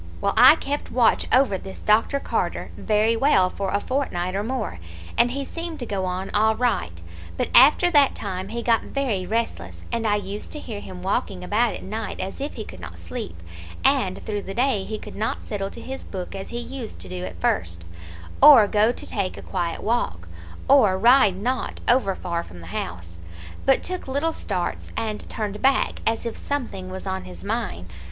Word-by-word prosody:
"Well, - - 0
I - - +9
kept 290 -2 -4
watch 240 -2 +3
over 250 -7 +4
this 190 - -9
Dr. 225 +6 +2
Carter - - -2
very 215 +1 +2
well 225 -8 +3
for 195 -1 -3
a 200 - +1
fortnight 185 -9 -2
or 195 - 0
more, 225 - -3 0.4
and 240 +1 +4
he 275 +2 -3
seemed 335 +1 -5
to 245 - -5
go 195 -4 -2
on 185 +1 -3
all 220 +1 +3
right; 90 - -1 0.4
but - - -1
after 300 +7 +7
that 290 -4 +5
time 190 -2 -4
he 235 +3 -4
got 230 -1 +3
very 225 -10 -2
restless, 230 +1 -3
and 230 -1 0
I 205 - +3
used 205 0 -5
to 300 - -5
hear 220 -7 -6
him 180 -2 -9
walking 190 -1 -1
about 215 +5 +1
at - - -8
night 220 +2 -5
as 190 +8 -5
if 285 - -4
he - - -5
could - - -11
not - - -9
sleep, 215 - -7 0.4
and 260 -9 +2
through 205 -1 -2
the 195 0 -7
day 240 -5 +1
he 215 - -4
could - - -10
not 215 +2 -2
settle 195 -2 -3
to 235 - -10
his 265 +3 -6
book 185 -2 -6
as 195 -1 -6
he 235 - -5
used 240 -1 -6
to - - -7
do 180 0 -5
at - - -7
first, 85 - -1 0.6
or 270 -7 +9
go 210 +3 +3
to - - -6
take 195 -3 -3
a - - -9
quiet 170 -1 -3
walk, 235 +3 -1 0.4
or 225 -9 +5
ride 225 -2 +5
not 245 +7 -2
over 235 -6 +3
far 170 -2 -3
from 90 - -12
the 85 - -11
house, 85 -1 -5 0.5
but 270 - +4
took 365 -4 -4
little 285 +5 0
starts 185 - -3
and 220 -2 -3
turned 210 -1 -4
back, 270 0 +2
as 225 +1 0
if 230 - -3
something 235 -10 -4
was 190 +1 -6
on 190 0 -3
his 90 -2 -10
mind. 85 +1 -3
215 Hz, 200 wpm, -24 LUFS, 190-250 Hz, 0.6 s, I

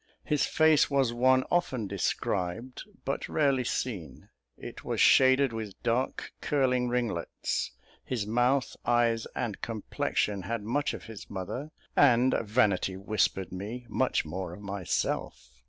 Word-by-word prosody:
His 150 -2 +1
face 155 -1 +4
was 135 -4 +2
one 130 +2 +4
often 130 -10 +1
described, 100 +4 -2 0.2
but 135 - -2
rarely 140 -4 +2
seen; 100 - -4 0.3
it - - -9
was - - -2
shaded 130 -1 +5
with 110 -3 -6
dark 120 +3 -1
curling 125 -3 +1
ringlets, 120 -9 -2 0.3
his 120 -6 -2
mouth, 125 +4 +1
eyes, 120 -1 +2
and 115 -5 -3
complexion 105 -2 -1
had 115 +3 -3
much 140 +7 -1
of - - -9
his 110 -3 -10
mother, 105 +10 -5 0.3
and, 130 -2 +5
vanity 100 -4 +1
whispered 95 -2 0
me, 105 +7 -6
much 130 - +1
more 90 +2 -5
of 100 - -12
myself. 95 -10 -3
115 Hz, 130 wpm, -29 LUFS, 100-130 Hz, 0.3 s, shaded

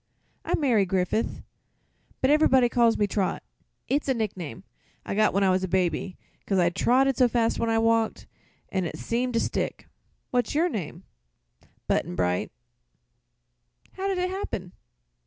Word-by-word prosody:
"I'm - - 0
Mayre 245 -9 +3
Griffith; 190 +3 -1 0.8
but 265 - +3
ever'body 265 -5 +4
calls 235 -1 +3
me 205 - +2
'Trot.' 200 -1 -1 0.4
It's 285 +1 0
a 265 - +2
nickname 190 -6 -4 0.4
I - - -3
got 215 +1 +3
when 200 +1 +1
I 190 - +4
was 185 0 +1
a - - 0
baby, 180 0 -1 0.3
'cause 195 - +1
I 175 -1 +3
trotted 260 +8 +2
so 255 - +5
fast 230 -1 0
when 230 - 0
I 225 - +2
walked, 225 0 +1 0.4
an' 190 -2 -1
it - - -5
seems 245 +2 -2
to 230 - +2
stick. - - -3 0.4
What's 245 +1 0
your 335 +4 +3
name?" 175 - -5 0.8
"Button 90 - -1
Bright." 90 +3 0 1.4
"How 385 +1 -4
did 390 -1 0
it 365 0 -1
happen?" 195 - -4
225 Hz, 155 wpm, -26 LUFS, 185-255 Hz, 1.4 s, so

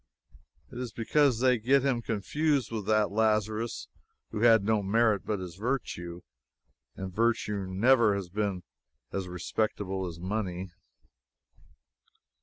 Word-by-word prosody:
It 120 - -7
is 125 -2 -4
because 125 +2 +2
they 125 -2 +4
get 135 +4 +3
him 125 -4 +1
confused 140 +6 0
with 105 -3 -4
that 110 -1 +2
Lazarus 110 +1 0 0.4
who - - -3
had 115 -3 +6
no 110 0 +2
merit 105 0 +2
but 105 - 0
his 90 -2 -7
virtue, 95 -7 -3 0.7
and 95 -1 -6
virtue 105 -3 0
never 110 +3 +4
has 100 -2 -4
been 100 -2 -2 0.5
as 95 -2 -3
respectable 95 +1 -2
as 85 -1 -8
money. 95 -1 -3
110 Hz, 125 wpm, -29 LUFS, 95-115 Hz, 0.7 s, had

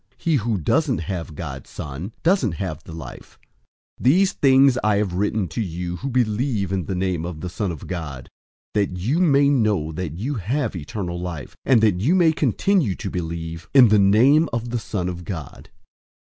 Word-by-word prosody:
He 165 -4 +1
who 115 -2 -1
doesn't 125 - +1
have 85 -3 -5
God's 70 -5 -7
Son 75 +8 -6
doesn't 165 - +2
have 80 -2 -5
the - - -10
life. 80 -2 -10 0.6
005:013 - - -10
These 185 +9 +4
things 135 -1 +5
I 105 -1 +3
have 100 -3 0
written 105 +1 0
to 80 - -3
you 90 -2 -4
who 135 - -4
believe 115 -4 0
in 95 -3 -1
the 95 - -3
name 90 -3 -1
of 85 -3 -6
the 90 - -4
Son 95 +2 -2
of 80 - -8
God, 75 -9 -6 0.5
that 100 -3 0
you 120 - 0
may 145 -5 +4
know 105 - +1
that 80 -1 -4
you 125 +10 -2
have 115 +3 -1
eternal 85 +2 -5
life, 85 -6 -6
and 125 -4 +4
that 100 -5 +2
you 150 - +3
may 170 -3 +5
continue 155 - +1
to 100 -4 -5
believe 85 -1 -5
in 125 -4 +8
the 105 0 +5
name 125 +11 +5
of 115 0 -3
the 120 - -1
Son 100 -3 -3
of 90 -1 -5
God. 80 -6 -7
100 Hz, 190 wpm, -22 LUFS, 85-125 Hz, 0.6 s, in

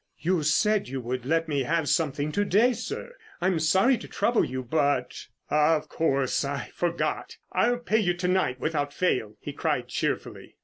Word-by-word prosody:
"You 170 +2 0
said 200 +7 +2
you 135 0 -3
would 125 +1 -4
let 165 +2 +1
me 145 -3 0
have 160 +3 0
something 150 -2 0
to 205 - +1
day, 225 +5 +3
sir. 240 - -6 0.3
I'm 185 -3 +1
sorry 190 +11 +3
to - - -9
trouble 235 -1 +1
you, 130 0 -3
but——" 140 -1 0 0.2
"Of 150 0 +3
course, 140 -5 +1
I 140 0 -4
forgot. 170 -1 -2
I'll 245 +1 +2
pay 225 -2 +1
you 175 -4 +1
to 180 +1 -2
night 180 -9 +1
without 145 -2 -2
fail," 120 - 0
he - - -7
cried - - -1
cheerfully. - - -3
160 Hz, 175 wpm, -27 LUFS, 140-190 Hz, 0.3 s, day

